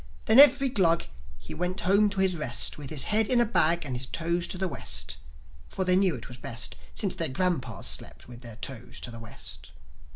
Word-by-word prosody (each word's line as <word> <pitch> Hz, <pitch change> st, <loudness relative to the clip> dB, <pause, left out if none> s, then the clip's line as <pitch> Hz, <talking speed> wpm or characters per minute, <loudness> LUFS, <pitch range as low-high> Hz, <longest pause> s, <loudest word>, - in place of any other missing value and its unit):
Then 225 Hz, -, +5 dB
every 275 Hz, -1 st, +7 dB
Glug, 175 Hz, -8 st, +2 dB, 0.3 s
he 65 Hz, -1 st, -10 dB
went 180 Hz, +2 st, -3 dB
home 200 Hz, +4 st, +3 dB
to 195 Hz, -1 st, -1 dB
his 190 Hz, -2 st, +2 dB
rest 150 Hz, -7 st, -1 dB
With 145 Hz, -3 st, -8 dB
his 150 Hz, -3 st, 0 dB
head 215 Hz, 0 st, +2 dB
in 250 Hz, -2 st, +5 dB
a 240 Hz, -, +4 dB
bag 170 Hz, -7 st, +2 dB
and 130 Hz, -3 st, -3 dB
his 125 Hz, +1 st, -3 dB
toes 170 Hz, +6 st, -1 dB
to -, -, -3 dB
the 190 Hz, +1 st, -1 dB
West; 70 Hz, -, -5 dB, 0.5 s
For 190 Hz, -, -2 dB
they 180 Hz, 0 st, +3 dB
knew 185 Hz, -3 st, +2 dB
it 120 Hz, -, -9 dB
was 120 Hz, -, -9 dB
best, 115 Hz, -2 st, -3 dB, 0.2 s
Since 195 Hz, -3 st, -1 dB
their 165 Hz, -3 st, -1 dB
grandpas 130 Hz, -, -2 dB
slept -, -, -1 dB
with 120 Hz, 0 st, -12 dB
their 115 Hz, -3 st, -9 dB
toes 120 Hz, 0 st, -6 dB
to 120 Hz, -, -3 dB
the 115 Hz, -, -9 dB
West. 70 Hz, -, -8 dB
165 Hz, 220 wpm, -27 LUFS, 120-190 Hz, 0.5 s, every